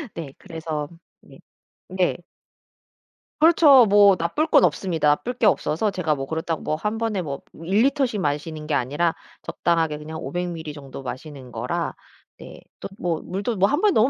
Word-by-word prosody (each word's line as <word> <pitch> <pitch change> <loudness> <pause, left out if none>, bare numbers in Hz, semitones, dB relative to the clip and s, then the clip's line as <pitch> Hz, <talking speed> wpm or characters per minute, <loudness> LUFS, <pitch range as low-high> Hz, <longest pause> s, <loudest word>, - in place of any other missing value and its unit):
네 155 -5 -7
그래서 155 -3 -5 0.3
네 - - -17 0.5
네. 185 -1 0 1.2
그렇죠. 300 -6 +7
뭐 200 -1 +6
나쁠 170 - 0
건 - - +5
없습니다. 165 -1 0
나쁠 230 +12 0
게 245 -2 0
없어서 195 +2 +1
제가 180 -5 -1
뭐 135 -1 -5
그렇다고 160 +1 -3
뭐 155 - -1
1 210 +8 -3
번에 225 -4 -1
뭐 140 -4 -5 0.2
1 195 +6 +2
리터씩 270 -6 +1
마시는 150 0 -3
게 150 - 0
아니라 145 +7 0 0.3
적당하게 165 -3 0
그냥 155 +1 -8
500 175 0 -3
밀리 160 -3 -6
정도 140 -2 -9
마시는 130 0 -8
거라 - - -3 0.4
네 - - -11 0.2
또 - - -5
뭐 170 -3 -1
물도 200 +5 -3
뭐 190 +1 +4
1 290 - 0
번에 420 -1 +4
너무 225 +5 +4
170 Hz, 295 characters per minute, -23 LUFS, 150-205 Hz, 1.2 s, 그렇죠